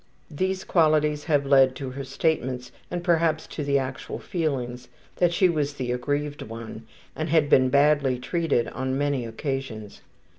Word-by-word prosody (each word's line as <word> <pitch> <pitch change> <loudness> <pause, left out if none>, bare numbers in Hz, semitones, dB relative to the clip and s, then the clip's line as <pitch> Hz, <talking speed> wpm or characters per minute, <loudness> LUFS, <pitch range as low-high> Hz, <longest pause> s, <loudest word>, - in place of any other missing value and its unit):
These 190 +5 -1
qualities 150 -3 +2
have 145 -4 +2
led 135 -2 +5
to 130 -1 -5
her 135 +2 -6
statements, 130 -3 -1 0.2
and 175 -1 -4
perhaps 165 -3 +2
to 150 - -5
the 140 0 +2
actual 135 0 -4
feelings, 125 -7 -3 0.3
that 175 -1 +3
she 185 +2 +4
was 150 -4 -1
the 125 -3 -3
aggrieved 145 +4 -2
one, 115 0 -8 0.3
and 155 +1 -3
had 155 -2 +3
been 130 0 +5
badly 140 -1 +3
treated 145 -1 0
on 130 0 -2
many 140 -4 0
occasions. 115 -4 -5
140 Hz, 155 wpm, -25 LUFS, 130-155 Hz, 0.3 s, led